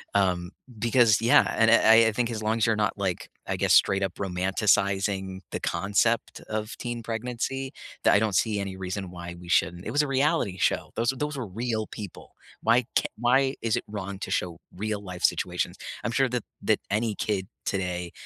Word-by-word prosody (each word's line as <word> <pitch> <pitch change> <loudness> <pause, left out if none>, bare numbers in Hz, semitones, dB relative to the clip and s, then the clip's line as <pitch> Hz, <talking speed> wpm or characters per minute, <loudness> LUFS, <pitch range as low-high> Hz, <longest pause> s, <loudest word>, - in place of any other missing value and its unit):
um, 90 -3 +1 0.3
because, 115 -1 +4
yeah, 115 +1 +5
and 115 0 +5
I 115 0 +7
I - - +2
think 120 +1 0
as 110 -1 -4
long 110 +1 +1
as 110 - +2
you're 115 - +2
not, 105 0 0
like, 95 -3 -2 0.2
I - - -1
guess, - - +1
straight 95 0 +4
up 95 -3 -2
romanticizing 95 0 0
the - - -3
concept 110 +4 0
of 110 +1 -3
teen 120 -1 -4
pregnancy, 125 +4 -3 0.3
that - - +5
I 100 - +6
don't 110 -3 0
see 105 +3 +2
any 100 -1 -4
reason 95 0 -4
why 85 -1 -8
we 90 - -12
shouldn't. 90 0 +1
It 110 - -3
was 145 +4 +3
a - - -2
reality 135 - +1
show, - - 0
those 115 0 +1
those 150 +2 -3
were 120 - -4
real 110 +2 -2
people. 100 -4 -9 0.3
Why 115 +2 +5 0.2
c - - +1
why 130 +3 +3
is 115 -2 +1
it - - -4
wrong 100 -2 -6
to - - -5
show 85 -2 -2 0.2
real 105 +2 -3
life 90 -3 -8
situations? - - 0 0.3
I'm - - -1
sure 130 +2 +2
that 125 -2 -2 0.2
that - - +2
any 110 +1 0
kid 100 -3 -2 0.2
today 90 -2 -2
105 Hz, 195 wpm, -26 LUFS, 95-115 Hz, 0.3 s, I